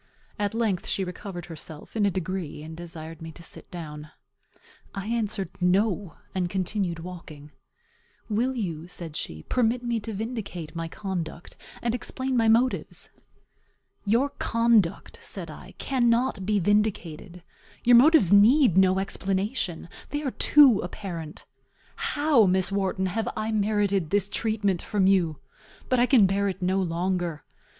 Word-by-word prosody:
At 205 +1 -1
length 220 -6 0
she 195 - 0
recovered 180 -1 -6
herself, 160 0 -10
in 210 -2 +3
a - - +3
degree, 180 -4 -4
and 160 +1 -8
desired 165 -1 -8
me 165 0 -7
to 170 - -11
sit - - -8
down. 150 -3 -8 0.9
I 195 0 -4
answered, 210 -5 -2
No, 190 0 +1 0.2
and 180 -2 -1
continued 190 -1 -1
walking. 165 -4 -10 0.8
"Will 240 +4 0
you," 170 -8 -4
said 170 -3 -6
she, 80 - -6
"permit 245 0 +1
me 235 -1 0
to 220 +1 -6
vindicate 205 -7 -5
my 165 0 -3
conduct, 175 -2 -5 0.3
and 235 -1 +1
explain 260 +2 -2
my 230 -2 +3
motives?" 235 +3 +1 0.9
"Your 235 +7 +2
conduct," 230 -6 +2
said - - -5
I, - - -12
"cannot 240 -5 +1
be 210 -1 +2
vindicated; 185 -3 -1 0.4
your 245 0 +6
motives 265 - +6
need 220 - +6
no 190 0 +4
explanation; 195 -1 -2 0.2
they 290 +1 -3
are 270 - -1
too 270 -8 +6
apparent. 175 -4 -6 0.5
How, 290 -8 +3
Miss 185 +1 +2
Wharton, 190 -1 0
have 210 +4 -1
I 215 +1 -1
merited 205 -4 +1
this 200 +1 +1
treatment 205 -5 0
from 200 -3 0
you? 180 -6 +3 0.5
But 255 - +3
I 245 - +4
can 245 -8 +6
bear 200 +1 +1
it 190 - -5
no 190 +1 +1
longer. 175 -2 -2
195 Hz, 145 wpm, -26 LUFS, 175-225 Hz, 0.9 s, your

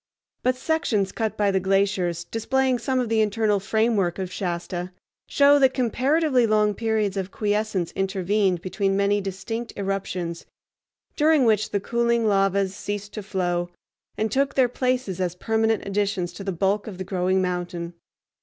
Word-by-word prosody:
But 255 0 +1
sections 255 -9 0
cut 220 -2 -2
by 205 -1 +2
the 190 - +2
glaciers, 190 -3 +1
displaying 255 +6 0
some 260 +3 0
of 250 - 0
the 220 0 +2
internal 210 -1 +1
framework 205 -3 +1
of 185 -1 -4
Shasta, 175 0 -3 0.4
show 285 0 +5
that 265 -1 +4
comparatively 260 +1 +2
long 210 -1 +3
periods 215 -2 -1
of 190 -1 -2
quiescence 210 -4 -1
intervened 190 -1 0
between 195 +1 0
many 200 +1 +2
distinct 200 +5 -5
eruptions, 185 -4 -3 0.7
during 300 -3 +4
which 215 -1 +2
the 200 - 0
cooling 235 +2 +1
lavas 195 -1 +2
ceased 205 0 -5
to 215 - -5
flow, 175 -3 -1 0.5
and 220 0 -1
took 275 +1 +1
their 260 -2 +4
places 250 -7 -1
as 180 -1 -1
permanent 220 +3 0
additions 195 -3 -1
to 195 - -8
the 195 - -2
bulk 195 +4 0
of 200 -4 -7
the 185 - -4
growing 185 0 0
mountain. 175 -2 -3
205 Hz, 155 wpm, -24 LUFS, 190-225 Hz, 0.7 s, show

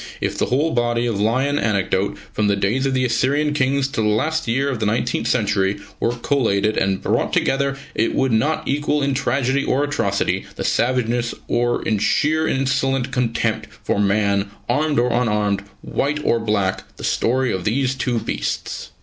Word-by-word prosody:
If - - -2
the - - 0
whole 145 +6 +1
body 120 -1 +1
of 110 -4 -1
lion 130 +7 +1
anecdote, 100 -2 0 0.2
from 105 -1 +1
the 100 - +3
days 110 +8 0
of 135 - 0
the 130 0 +2
Assyrian 140 +5 +1
Kings 135 -1 +1
till 115 -5 -2
the - - +3
last 155 +9 0
year 135 +5 +1
of 130 -5 -2
the 110 - 0
nineteenth 115 +1 0
century, 100 -4 +1 0.2
were 120 - 0
collated 110 -5 +1
and 95 0 0
brought - - 0
together, 135 0 +1 0.2
it 115 - 0
would 135 -1 +2
not 145 +8 +1
equal 145 +1 0
in 140 0 +1
tragedy 135 +1 0
or 140 +2 +1
atrocity, 145 0 -1
in - - -3
savageness 120 -1 0
or 120 0 0
in 110 -2 0
sheer 155 +8 +2
insolent 135 -1 0
contempt 115 -3 -1 0.2
for - - 0
man, 100 0 +1 0.2
armed 150 +4 +1
or 120 +1 +2
unarmed, 105 -4 +1 0.2
white 150 +2 -1
or 115 - +3
black, 105 -4 0
the - - -9
story 130 +2 +1
of 95 - -3
these 130 +5 +1
two 125 -2 -1
beasts. - - -3
120 Hz, 175 wpm, -21 LUFS, 110-135 Hz, 0.2 s, the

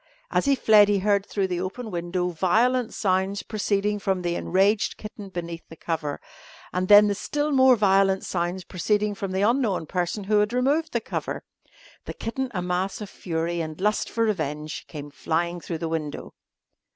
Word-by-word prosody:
As - - +1
he 280 0 +4
fled 215 -5 +6
he 205 -1 +2
heard 200 0 +1
through 200 -2 0
the 180 -2 -2
open 215 +5 -5
window 175 +1 -2
violent 225 +8 +2
sounds 190 0 0
proceeding 210 -1 -1
from 190 -2 -1
the 175 0 0
enraged 195 +4 +1
kitten 210 -2 -9
beneath 170 -2 -5
the 165 - -10
cover, 155 -3 -3 0.5
and 185 +1 0
then 205 +1 +9
the 205 - +1
still 295 +8 -2
more 260 -2 +6
violent 195 -2 +3
sounds 175 +1 -2
proceeding 205 +4 0
from 195 -1 -5
the 190 +1 0
unknown 220 -7 +1
person 180 +5 -2
who 210 +1 +3
removed 270 +8 +1
the 235 - -1
cover. - - -4 0.6
The - - -6
kitten, 260 +3 -3
a 180 -5 -3
mass 180 +2 -1
of 210 -3 -7
fury 170 0 -2
and 155 0 -6
lust 210 +2 0
for 230 - 0
revenge, 155 -7 -2
came 145 -1 -8
flying 170 +5 -1
through 165 - -4
the 165 +1 -3
window. 160 -2 -4
195 Hz, 175 wpm, -25 LUFS, 175-210 Hz, 0.6 s, then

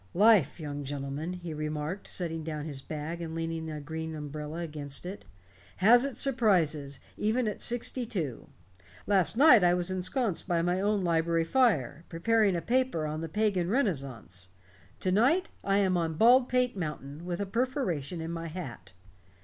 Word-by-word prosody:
"Life, 200 - +5
young 145 -2 -5
gentlemen," 140 +4 -4
he 175 -3 -6
remarked, 155 +4 -4
setting 165 -3 -3
down 155 -1 -4
his 140 -4 -4
bag 155 +4 -5
and 165 -1 -5
leaning 165 -1 -3
a 155 -1 -5
green 160 +2 -5
umbrella 150 +2 -6
against 150 -2 -6
it, 190 - -7 0.5
"has 240 +7 +6
its 275 - -3
surprises 165 - +2 0.2
even 220 +3 +1
at 210 - -3
sixty 240 +1 0
two. 160 - -4 0.6
Last 200 +1 +2
night 260 -7 +7
I 175 0 +5
was 180 +1 -1
ensconced 185 +2 0
by 170 -2 +1
my 180 +2 0
own 205 0 +1
library 165 -1 +1
fire, 165 - +1
preparing 205 +3 +2
a 170 - -2
paper 255 -10 +1
on 155 +1 -3
the 165 - -5
Pagan 195 -2 0
Renaissance. 135 - -2 0.5
To 185 - +1
night 265 - +3
I 195 0 +2
am 190 -2 +2
on 165 -2 -1
Baldpate 250 +3 +4
Mountain, 150 -3 -5
with 175 -1 -4
a 200 - -1
perforation 195 - -2
in 165 +1 -4
my 165 0 -4
hat." 130 - -8
170 Hz, 165 wpm, -29 LUFS, 155-210 Hz, 0.6 s, night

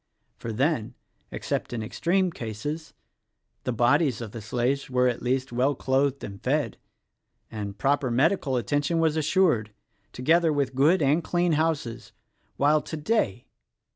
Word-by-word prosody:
For 115 - -5
then 130 0 0 0.2
— - - -43
except - - -3
in 115 -2 -3
extreme 180 - 0
cases 145 +6 -6 0.3
— - - -51
the - - 0
bodies 120 +2 +2
of 115 -3 -6
the 115 - -7
slaves 125 +6 -1
were, 125 0 +2
at 120 -2 -1
least, 130 +1 -1
well 130 +4 +1
clothed 135 +2 0
and 100 -1 -8
fed, - - 0 0.7
and 100 -2 -5
proper 140 +1 +1
medical 135 +2 +2
attention 145 - 0
was 160 -2 +2
assured 155 - +2 0.2
— 100 - -43
together 160 +6 +2
with 140 -3 0
good 150 +6 +3
and 150 +5 +2
clean 175 0 +1
houses 150 -7 -1 0.2
— - - -43
while 150 +2 +3
today! 150 - -1
135 Hz, 155 wpm, -26 LUFS, 120-155 Hz, 0.7 s, good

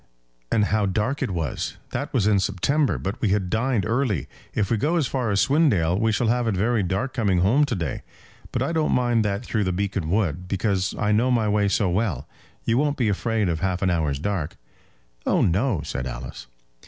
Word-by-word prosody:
"And 105 -2 +3
how 105 -1 +1
dark 105 +8 -1
it - - 0
was! 80 -8 -3
That - - -3
was 100 - +1
in 105 -2 +4
September, 130 +10 +1
but 100 +5 -4
we 110 - +2
had 95 -2 0
dined 115 -3 +1
early. 115 - 0 0.3
If 100 -3 0
we 115 - +3
go 155 +11 +1
as 165 -5 +2
far 125 -3 -1
as 100 -1 +2
Swindale 120 - +3
we 110 0 +2
shall 120 - 0
have 120 +1 +1
it 110 - +1
very 110 +4 +1
dark 95 +8 -2
coming 100 -7 +1
home 125 +11 +4
to 125 - -2
day; 85 -7 -3 0.5
but - - 0
I - - -1
don't 160 -2 +1
mind 120 -3 +2
that 105 +3 -2
through 110 -2 0
the 90 - 0
Beacon 95 -3 -2
Wood, 90 -3 0
because 95 0 0
I 105 0 +1
know 115 +4 +3
my 115 -4 +2
way 105 -1 +2
so 100 0 +1
well. 90 - -1 0.4
You 115 +2 +2
won't 145 0 +1
be 120 -5 +1
afraid 110 +1 0
of 85 -2 -1
half 95 +1 -1
an 95 - +2
hour's 80 -5 0
dark?" 85 0 -3 0.7
"Oh, - - +3
no," 95 - +1
said 65 -4 -4
Alice. - - -7
105 Hz, 215 wpm, -24 LUFS, 90-120 Hz, 0.7 s, in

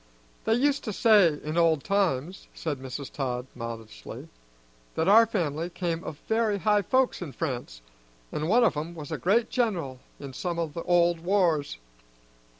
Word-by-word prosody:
"They 220 - +3
used 280 +3 +1
to 215 - -3
say 195 -9 +5
in 155 +3 -1
old 160 -4 +3
times," 185 -4 -1
said 150 -5 -3
Mrs. 130 +1 -6
Todd 125 -3 -3
modestly, 115 -2 -8 0.7
"that 160 - 0
our 225 +3 +7
family 165 -5 -2
came 170 -1 -3
of 150 - -6
very 220 -2 +1
high 210 +1 +2
folks 260 +5 +1
in 155 -6 -6
France, 120 - -4 0.5
and 155 +2 -2
one 240 +4 +5
of 230 - +3
'em 160 +3 -4
was 150 -3 -8
a - - -3
great 225 +5 +2
general 175 - -1 0.2
in 140 -2 -8
some 175 +4 -3
o' 170 - 0
the 165 +3 -6
old 175 -1 +3
wars. 170 - +1
170 Hz, 165 wpm, -27 LUFS, 145-205 Hz, 0.7 s, our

